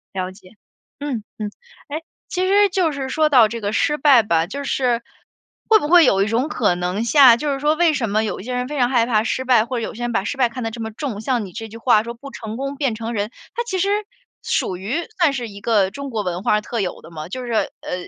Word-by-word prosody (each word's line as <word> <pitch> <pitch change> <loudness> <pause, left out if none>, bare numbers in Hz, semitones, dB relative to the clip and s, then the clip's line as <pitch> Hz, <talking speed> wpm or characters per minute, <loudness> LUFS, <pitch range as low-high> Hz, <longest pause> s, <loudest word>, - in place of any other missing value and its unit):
了 185 0 -2
解， 190 -1 -17 0.5
嗯 265 -7 -3 0.2
嗯。 210 -1 -3 0.4
诶， 310 +3 -4 0.3
其 370 +1 -1
实 405 +1 +5
就 360 -4 +1
是 270 -2 -4
说 310 +2 +2
到 245 -6 +6
这 230 -1 -5
个 205 0 -1
失 295 +5 +1
败 265 -6 +6
吧， 165 -4 +1
就 280 +6 -5
是， 245 -4 0 0.7
会 440 - +8
不 295 - -3
会 350 -1 +7
有 195 0 +3
一 - - -1
种 235 +6 0
可 210 -11 +1
能 180 +5 -2
性 255 -3 +7
就 290 0 -1
是 275 - -4
说 300 +2 +2
为 330 -1 +3
什 235 -7 -1
么 215 +2 +1
有 210 - -3
一 - - -8
些 250 +1 -5
人 250 0 -2
非 295 -1 -4
常 245 - +3
害 240 -3 +3
怕 220 -3 +2
失 260 +2 -1
败， 240 -4 +4
或 250 +1 -3
者 230 - -2
有 - - -4
些 240 - -8
人 240 - -1
把 195 - +1
失 280 - -3
败 245 -3 +3
看 250 +1 -6
得 225 - -2
这 230 0 -7
么 220 - -3
重。 220 -4 -5
像 240 -3 -1
你 185 - -10
这 225 - -6
句 225 - -10
话 230 -2 +4
说： 235 - -6
“不 275 +3 -11
成 220 0 -7
功 275 +1 -4
便 265 -6 0
成 230 +1 -5
仁。” 210 -1 -2 0.3
它 475 - -1
其 395 -5 -2
实， 390 - +1 0.5
属 185 - -1
于 250 - -3
算 315 -5 +4
是 240 -4 -4
一 200 0 -10
个 205 -4 +2
中 280 +3 -6
国 220 -4 -2
文 180 0 -3
化 210 0 +2
特 230 +2 -4
有 180 - -4
的 170 - -14
嘛， 155 -1 -7
就 255 +3 -5
是 240 - -5 0.3
呃， 180 0 -5
235 Hz, 290 characters per minute, -21 LUFS, 210-280 Hz, 0.7 s, 会